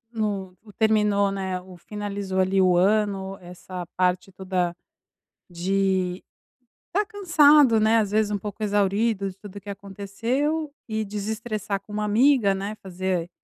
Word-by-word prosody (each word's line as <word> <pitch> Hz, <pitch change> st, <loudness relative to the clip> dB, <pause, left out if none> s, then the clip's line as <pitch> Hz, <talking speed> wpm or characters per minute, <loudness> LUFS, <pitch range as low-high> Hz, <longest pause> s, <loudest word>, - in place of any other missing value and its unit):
hum, 200 Hz, -4 st, -2 dB
o 210 Hz, -, -14 dB
terminou, 210 Hz, -2 st, +2 dB
né, 190 Hz, -2 st, -3 dB
o 185 Hz, 0 st, -13 dB
finalizou 200 Hz, -1 st, -4 dB
ali 190 Hz, +1 st, +3 dB
o 180 Hz, -1 st, +4 dB
ano, 195 Hz, 0 st, +1 dB
essa 180 Hz, 0 st, -8 dB
parte 180 Hz, +1 st, +1 dB
toda, 185 Hz, -2 st, -2 dB, 0.8 s
de 185 Hz, +1 st, 0 dB, 0.7 s
estar 410 Hz, +3 st, 0 dB
cansado, 300 Hz, -, +5 dB
né, 220 Hz, +1 st, +4 dB
às 210 Hz, -3 st, 0 dB
vezes 215 Hz, -1 st, +2 dB
um 205 Hz, -, 0 dB
pouco 210 Hz, +2 st, -6 dB
exaurido 205 Hz, 0 st, +1 dB
de 185 Hz, -, -12 dB
tudo 205 Hz, 0 st, -11 dB
o -, -, -8 dB
que 205 Hz, -, -10 dB
aconteceu 230 Hz, +11 st, -2 dB, 0.2 s
e 220 Hz, 0 st, -1 dB
desestressar 210 Hz, 0 st, -3 dB
com 205 Hz, +1 st, -12 dB
uma 215 Hz, -, -1 dB
amiga, 215 Hz, -1 st, +4 dB
né, 200 Hz, +2 st, -4 dB
fazer, 185 Hz, -2 st, -2 dB
200 Hz, 145 wpm, -24 LUFS, 190-215 Hz, 0.8 s, cansado